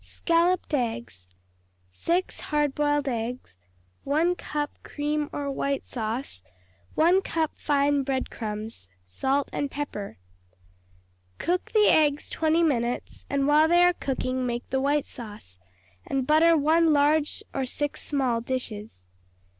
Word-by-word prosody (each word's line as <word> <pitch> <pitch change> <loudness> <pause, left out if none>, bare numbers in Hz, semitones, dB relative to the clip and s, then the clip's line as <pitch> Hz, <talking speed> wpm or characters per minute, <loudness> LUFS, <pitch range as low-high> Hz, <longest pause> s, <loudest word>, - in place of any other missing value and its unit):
Scalloped 340 0 +1
Eggs 115 - -2 0.6
6 345 - -1
hard 295 -2 +1
boiled 290 -1 +1
eggs. 240 - -3 0.5
1 315 +5 +2
cup 295 -4 -3
cream 295 0 -2
or 285 -1 -3
white 275 0 -1
sauce. 225 - -4 0.5
1 350 +4 +4
cup 325 -4 -1
fine 285 -1 +2
bread 265 -1 -2
crumbs. 215 - -6 0.2
Salt 265 - 0
and 285 - -1
pepper. 270 -9 -5 1.2
Cook 360 +5 -1
the 425 -1 +5
eggs 295 -2 +3
twenty 320 +1 +2
minutes, 245 -6 -1
and 280 -1 +1
while 300 +2 +5
they 345 +1 +5
are 355 0 +5
cooking 255 -4 -2
make 240 -1 -3
the 265 0 +1
white 285 +1 +1
sauce, 205 - -10 0.5
and 265 -2 -1
butter 320 +3 +5
one 315 +2 +4
large 295 +1 +2
or 270 -2 -2
six 290 +3 -3
small 260 -5 0
dishes. 220 - -5
280 Hz, 130 wpm, -26 LUFS, 245-310 Hz, 1.2 s, the